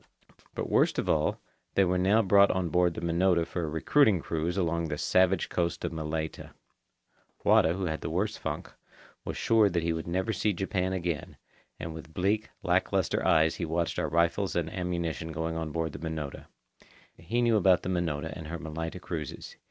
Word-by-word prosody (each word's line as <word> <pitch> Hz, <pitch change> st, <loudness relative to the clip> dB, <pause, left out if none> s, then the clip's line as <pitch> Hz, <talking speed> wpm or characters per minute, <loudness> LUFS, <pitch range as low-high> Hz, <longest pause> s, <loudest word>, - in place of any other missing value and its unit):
But -, -, -2 dB
worst -, -, +2 dB
of -, -, -1 dB
all, -, -, +1 dB, 0.4 s
they 100 Hz, -, +5 dB
were 90 Hz, 0 st, +1 dB
now 100 Hz, +5 st, +4 dB
brought 100 Hz, 0 st, +6 dB
on 95 Hz, -2 st, 0 dB
board 90 Hz, 0 st, +2 dB
the -, -, -5 dB
Minota 85 Hz, 0 st, +2 dB
for 85 Hz, +1 st, -4 dB
a 80 Hz, -, -2 dB
recruiting 95 Hz, -, +3 dB
cruise 80 Hz, +3 st, -2 dB
along 85 Hz, -2 st, 0 dB
the 75 Hz, -2 st, -3 dB
savage 95 Hz, +3 st, +2 dB
coast 85 Hz, -5 st, -1 dB
of -, -, -2 dB
Malaita. 80 Hz, 0 st, -4 dB, 0.9 s
Wada, 80 Hz, -, +5 dB
who 95 Hz, +1 st, -3 dB
had 80 Hz, -2 st, -3 dB
the -, -, -3 dB
worse 100 Hz, +7 st, -1 dB
funk, -, -, -5 dB, 0.5 s
was -, -, -4 dB
sure 110 Hz, -3 st, +4 dB
that 85 Hz, -2 st, -1 dB
he 85 Hz, 0 st, +1 dB
would 80 Hz, 0 st, -5 dB
never 95 Hz, +6 st, -1 dB
see 105 Hz, +2 st, +1 dB
Japan 95 Hz, 0 st, -1 dB
again, 85 Hz, -4 st, -3 dB, 0.4 s
and 80 Hz, +1 st, -5 dB
with 80 Hz, 0 st, -10 dB
bleak, 105 Hz, +4 st, 0 dB
lack -, -, +1 dB
lustre -, -, 0 dB
eyes 80 Hz, +1 st, +3 dB
he -, -, -3 dB
watched 85 Hz, +1 st, -1 dB
our -, -, -1 dB
rifles 85 Hz, +5 st, +1 dB
and 85 Hz, -2 st, -1 dB
ammunition 85 Hz, -3 st, -3 dB
going 80 Hz, +1 st, -3 dB
on 80 Hz, -1 st, -3 dB
board 80 Hz, 0 st, -2 dB
the -, -, -8 dB
Minota. 80 Hz, -4 st, -5 dB, 0.7 s
He 115 Hz, +9 st, -1 dB
knew 120 Hz, -1 st, +3 dB
about 95 Hz, -4 st, +4 dB
the -, -, -3 dB
Minota 80 Hz, -3 st, -1 dB
and 80 Hz, -3 st, -8 dB
her 85 Hz, +2 st, -4 dB
Malaita 80 Hz, +2 st, -5 dB
cruises. 80 Hz, -6 st, -6 dB
85 Hz, 190 wpm, -29 LUFS, 80-95 Hz, 0.9 s, brought